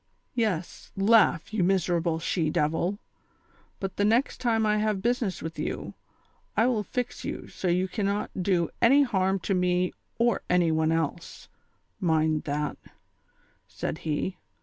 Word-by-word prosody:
" -, -, -46 dB
Yes, 210 Hz, -8 st, -2 dB
laugh, 200 Hz, -3 st, +4 dB
you 210 Hz, -4 st, +1 dB
miserable 175 Hz, -3 st, +1 dB
she 165 Hz, -1 st, 0 dB
devil; 160 Hz, +6 st, 0 dB, 0.8 s
but 195 Hz, -1 st, -4 dB
the 205 Hz, -, +2 dB
next 230 Hz, +6 st, +2 dB
time 225 Hz, -3 st, +2 dB
I 210 Hz, 0 st, +2 dB
have 210 Hz, -2 st, 0 dB
business 235 Hz, -5 st, 0 dB
with 160 Hz, +1 st, -6 dB
you, -, -, -4 dB, 0.6 s
I 225 Hz, -, +5 dB
will 240 Hz, -4 st, +2 dB
fix 245 Hz, +4 st, -4 dB
you -, -, -5 dB
so 185 Hz, -, -4 dB
you 180 Hz, +2 st, +2 dB
cannot 200 Hz, +1 st, -2 dB
do 175 Hz, -3 st, +1 dB
any 275 Hz, +5 st, +6 dB
harm 190 Hz, -6 st, +1 dB
to 195 Hz, -, -1 dB
me 180 Hz, 0 st, +1 dB, 0.2 s
or 235 Hz, -2 st, +2 dB
any 175 Hz, -2 st, +3 dB
one 160 Hz, 0 st, +2 dB
else, 165 Hz, +1 st, -3 dB, 0.5 s
mind 160 Hz, -4 st, +1 dB
that," 150 Hz, 0 st, -2 dB, 0.9 s
said 160 Hz, -, -4 dB
he. 160 Hz, +4 st, -2 dB
185 Hz, 150 wpm, -27 LUFS, 165-215 Hz, 0.9 s, any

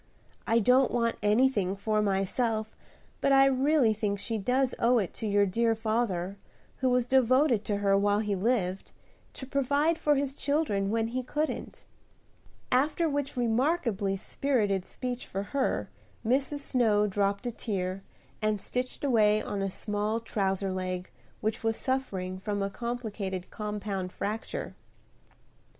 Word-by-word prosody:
I 225 Hz, -, +3 dB
don't 250 Hz, +4 st, +4 dB
want 230 Hz, -1 st, 0 dB
anything 210 Hz, -3 st, +2 dB
for 215 Hz, +2 st, 0 dB
myself, 215 Hz, +3 st, 0 dB, 0.5 s
but 275 Hz, -, +3 dB
I 270 Hz, 0 st, +7 dB
really 270 Hz, -2 st, +3 dB
think 210 Hz, -1 st, -1 dB
she 215 Hz, 0 st, -3 dB
owes 260 Hz, 0 st, +2 dB, 0.3 s
it 195 Hz, -, -2 dB
to 220 Hz, -, -4 dB
your 205 Hz, 0 st, +3 dB
dear 225 Hz, +4 st, +1 dB
father, 215 Hz, -4 st, -1 dB, 0.4 s
who 260 Hz, -, +1 dB
was 250 Hz, -1 st, +2 dB
devoted 255 Hz, -2 st, +3 dB
to 205 Hz, -, 0 dB
her 200 Hz, -1 st, +3 dB
while 205 Hz, +1 st, +3 dB
he 210 Hz, -1 st, 0 dB
lived, 195 Hz, -2 st, -1 dB, 0.4 s
to 265 Hz, -, -7 dB
provide 285 Hz, +4 st, +1 dB
for 295 Hz, -1 st, +3 dB
his 275 Hz, -1 st, -1 dB
children 280 Hz, -10 st, 0 dB
when 225 Hz, +1 st, 0 dB
he 255 Hz, +2 st, -2 dB
couldn't;" 300 Hz, +5 st, -3 dB, 0.9 s
after 300 Hz, +6 st, +2 dB
which 285 Hz, -3 st, -2 dB
remarkably 230 Hz, -, +1 dB
spirited 205 Hz, -5 st, 0 dB
speech 250 Hz, -1 st, -5 dB
for 195 Hz, +1 st, -3 dB
her, 270 Hz, +6 st, -1 dB, 0.4 s
Mrs. 275 Hz, +4 st, +1 dB
Snow 220 Hz, -7 st, +2 dB
dropped 200 Hz, +2 st, 0 dB
a 240 Hz, -, -1 dB
tear, 195 Hz, -4 st, -3 dB, 0.4 s
and 215 Hz, -1 st, +1 dB
stitched 250 Hz, +7 st, -4 dB
away 215 Hz, -6 st, +4 dB
on 205 Hz, -2 st, -3 dB
a 195 Hz, -, 0 dB
small 210 Hz, +3 st, -2 dB
trouser 195 Hz, -3 st, -1 dB
leg 185 Hz, -1 st, -4 dB, 0.3 s
which 220 Hz, +1 st, -2 dB
was 225 Hz, 0 st, +1 dB
suffering 190 Hz, -9 st, -2 dB
from 205 Hz, 0 st, -2 dB
a 195 Hz, -, -2 dB
complicated 215 Hz, -6 st, -4 dB
compound 210 Hz, -3 st, -4 dB
fracture. 215 Hz, +4 st, -4 dB
220 Hz, 140 wpm, -29 LUFS, 200-255 Hz, 0.9 s, I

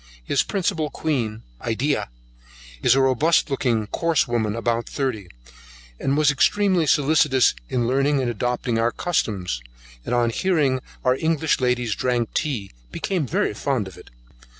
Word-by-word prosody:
His -, -, +1 dB
principal 165 Hz, -6 st, -1 dB
queen, 120 Hz, -8 st, -2 dB, 0.2 s
Edea, 130 Hz, +6 st, 0 dB, 0.7 s
is 125 Hz, -, +4 dB
a 135 Hz, -, +4 dB
robust 145 Hz, +4 st, +2 dB
looking, 120 Hz, -5 st, 0 dB
course 165 Hz, +7 st, +1 dB
woman, 110 Hz, -3 st, -1 dB
about 115 Hz, 0 st, -1 dB
thirty, 125 Hz, -9 st, -3 dB, 0.7 s
and 135 Hz, +1 st, 0 dB
was 150 Hz, -1 st, +4 dB
extremely 185 Hz, +2 st, +2 dB
solicitous 145 Hz, -3 st, +4 dB, 0.2 s
in 125 Hz, -3 st, 0 dB
learning 140 Hz, +3 st, +2 dB
and 130 Hz, -, 0 dB
adopting 120 Hz, 0 st, -1 dB
our 115 Hz, +1 st, +2 dB
customs, 100 Hz, -, -2 dB, 0.4 s
and 125 Hz, -, -1 dB
on 120 Hz, -1 st, +2 dB
hearing 150 Hz, -4 st, +1 dB, 0.3 s
our 125 Hz, 0 st, +4 dB
English 160 Hz, -1 st, +1 dB
ladies 125 Hz, -3 st, +1 dB
drank 120 Hz, 0 st, -1 dB
tea, 120 Hz, -10 st, -2 dB, 0.2 s
became 180 Hz, -8 st, -2 dB
very 105 Hz, -, 0 dB
fond 120 Hz, -2 st, -1 dB
of 95 Hz, -, -11 dB
it. -, -, -14 dB
130 Hz, 145 wpm, -23 LUFS, 115-150 Hz, 0.7 s, is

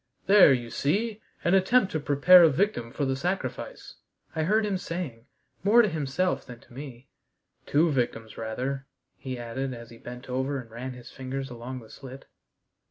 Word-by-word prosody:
"There, 195 Hz, -5 st, +8 dB
you 120 Hz, -3 st, 0 dB
see, 210 Hz, +9 st, -1 dB, 0.2 s
an 175 Hz, -, +2 dB
attempt 195 Hz, +2 st, +4 dB
to 155 Hz, -, -1 dB
prepare 150 Hz, +6 st, +7 dB
a 165 Hz, -, +7 dB
victim 150 Hz, -, 0 dB
for 140 Hz, +2 st, -2 dB
the 135 Hz, 0 st, 0 dB
sacrifice," 185 Hz, -, -4 dB, 0.4 s
I 160 Hz, -, 0 dB
heard 210 Hz, +7 st, +2 dB
him 195 Hz, -3 st, -1 dB
saying, 165 Hz, -11 st, -5 dB, 0.4 s
more 225 Hz, +5 st, +6 dB
to -, -, +3 dB
himself 160 Hz, +2 st, -1 dB
than 120 Hz, -1 st, -11 dB
to -, -, -19 dB
me, 130 Hz, -1 st, -9 dB, 0.6 s
"two 160 Hz, +3 st, +3 dB
victims 120 Hz, -4 st, -2 dB
rather," 130 Hz, +5 st, -4 dB, 0.3 s
he 130 Hz, -2 st, -5 dB
added 125 Hz, +2 st, -4 dB
as 115 Hz, 0 st, -11 dB
he 115 Hz, -, -13 dB
bent 125 Hz, +1 st, -9 dB
over 130 Hz, +2 st, -1 dB
and 115 Hz, -3 st, -11 dB
ran 125 Hz, +3 st, -6 dB
his 125 Hz, -1 st, -12 dB
fingers 135 Hz, 0 st, -5 dB
along 125 Hz, +2 st, -7 dB
the 110 Hz, -, -15 dB
slit. 135 Hz, 0 st, -11 dB
135 Hz, 175 wpm, -27 LUFS, 125-180 Hz, 0.6 s, There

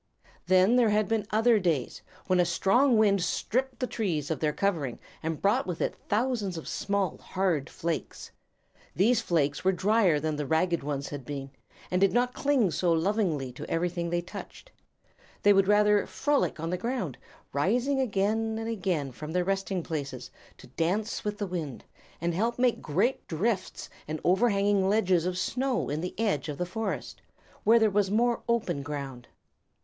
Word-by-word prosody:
Then 185 Hz, +6 st, +5 dB
there 235 Hz, -3 st, +4 dB
had 210 Hz, 0 st, +2 dB
been 225 Hz, -2 st, -1 dB
other 225 Hz, +1 st, +4 dB
days, 165 Hz, -9 st, -1 dB, 0.2 s
when 185 Hz, -1 st, +2 dB
a -, -, +6 dB
strong 220 Hz, +9 st, +3 dB
wind 200 Hz, -3 st, +4 dB
stripped 255 Hz, +8 st, -1 dB
the 255 Hz, -, 0 dB
trees 170 Hz, -, -2 dB
of 160 Hz, -, -1 dB
their 155 Hz, -1 st, +1 dB
covering, 160 Hz, -10 st, -1 dB, 0.2 s
and 160 Hz, -1 st, -3 dB
brought 200 Hz, -1 st, +2 dB
with 175 Hz, -3 st, -3 dB
it -, -, -1 dB
thousands 215 Hz, -5 st, 0 dB
of 160 Hz, -, -7 dB
small, 200 Hz, -4 st, -1 dB
hard 180 Hz, -7 st, -1 dB
flakes. 165 Hz, -2 st, -4 dB, 0.6 s
These 220 Hz, +5 st, +3 dB
flakes 145 Hz, -4 st, 0 dB
were 190 Hz, -, +4 dB
drier 190 Hz, -3 st, +3 dB
than 155 Hz, 0 st, -2 dB
the 145 Hz, -2 st, -3 dB
ragged 165 Hz, +2 st, +1 dB
ones 140 Hz, 0 st, -3 dB
had 145 Hz, -2 st, -6 dB
been, 135 Hz, 0 st, -6 dB, 0.4 s
and 180 Hz, +1 st, +1 dB
did 195 Hz, -, +4 dB
not 245 Hz, +1 st, +2 dB
cling 265 Hz, -10 st, +2 dB
so 175 Hz, +1 st, +1 dB
lovingly 165 Hz, -, 0 dB
to 125 Hz, -, -9 dB
everything 170 Hz, 0 st, -1 dB
they 175 Hz, 0 st, 0 dB
touched. 340 Hz, -, -10 dB, 0.7 s
They 205 Hz, -, +7 dB
would 195 Hz, -1 st, +3 dB
rather 210 Hz, 0 st, +4 dB
frolic 290 Hz, -, 0 dB
on 165 Hz, +2 st, -3 dB
the 180 Hz, -, -2 dB
ground, 230 Hz, -, -3 dB, 0.3 s
rising 245 Hz, -, +1 dB
again 220 Hz, -1 st, 0 dB
and 225 Hz, 0 st, -4 dB
again 180 Hz, -11 st, -1 dB
from 150 Hz, +5 st, -7 dB
their 180 Hz, 0 st, +2 dB
resting 195 Hz, -1 st, -1 dB
places 145 Hz, -4 st, -5 dB, 0.3 s
to -, -, -14 dB
dance 185 Hz, -, -1 dB
around -, -, -16 dB
with 210 Hz, 0 st, -2 dB
the 205 Hz, -, -2 dB
wind, 165 Hz, -9 st, -5 dB, 0.4 s
and 170 Hz, +1 st, -1 dB
help 230 Hz, +7 st, 0 dB
make 245 Hz, -1 st, +2 dB
great 195 Hz, -, 0 dB
drifts 185 Hz, +4 st, -2 dB, 0.2 s
and 155 Hz, +1 st, -3 dB
overhanging 200 Hz, 0 st, +3 dB
ledges 185 Hz, -5 st, +2 dB
of 180 Hz, 0 st, -2 dB
snow 250 Hz, +6 st, -1 dB
in 150 Hz, +2 st, -2 dB
the 180 Hz, +3 st, -6 dB
edge 200 Hz, -10 st, 0 dB
of 145 Hz, -, -4 dB
the 180 Hz, -, -1 dB
Forest, 220 Hz, +5 st, -4 dB, 0.4 s
where 230 Hz, +2 st, +6 dB
there 220 Hz, -2 st, +3 dB
was 200 Hz, -1 st, +2 dB
more 235 Hz, +3 st, +2 dB
open 200 Hz, -11 st, 0 dB
ground. 140 Hz, -3 st, -6 dB
190 Hz, 175 wpm, -28 LUFS, 160-220 Hz, 0.7 s, They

